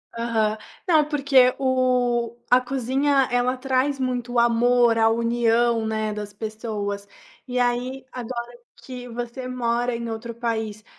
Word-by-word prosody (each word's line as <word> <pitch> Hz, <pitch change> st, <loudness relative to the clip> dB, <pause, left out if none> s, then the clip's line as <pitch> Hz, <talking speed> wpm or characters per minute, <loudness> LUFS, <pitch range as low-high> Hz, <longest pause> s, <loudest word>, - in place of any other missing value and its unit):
Aham. 225 Hz, -2 st, 0 dB, 0.3 s
Não, 315 Hz, -3 st, +4 dB
porque 275 Hz, -4 st, +4 dB
o 250 Hz, -3 st, +1 dB
a 250 Hz, -, +6 dB
cozinha, 270 Hz, +2 st, +1 dB
ela 245 Hz, +1 st, +1 dB
traz 270 Hz, +2 st, 0 dB
muito 250 Hz, -2 st, -2 dB
o 240 Hz, -, +3 dB
amor, 235 Hz, 0 st, +4 dB
a 225 Hz, 0 st, +4 dB
união, 235 Hz, 0 st, +2 dB
né, 215 Hz, -1 st, -1 dB
das 210 Hz, -1 st, -6 dB
pessoas, 210 Hz, -2 st, -4 dB, 0.4 s
e 250 Hz, 0 st, -2 dB
aí, 250 Hz, +2 st, -1 dB
agora 240 Hz, -1 st, -6 dB, 0.3 s
que 250 Hz, -1 st, -8 dB
você 240 Hz, +2 st, -5 dB
mora 240 Hz, -1 st, -1 dB
em 235 Hz, 0 st, -4 dB
outro 225 Hz, +1 st, -5 dB
país, 220 Hz, -2 st, -3 dB
240 Hz, 135 wpm, -23 LUFS, 230-255 Hz, 0.4 s, a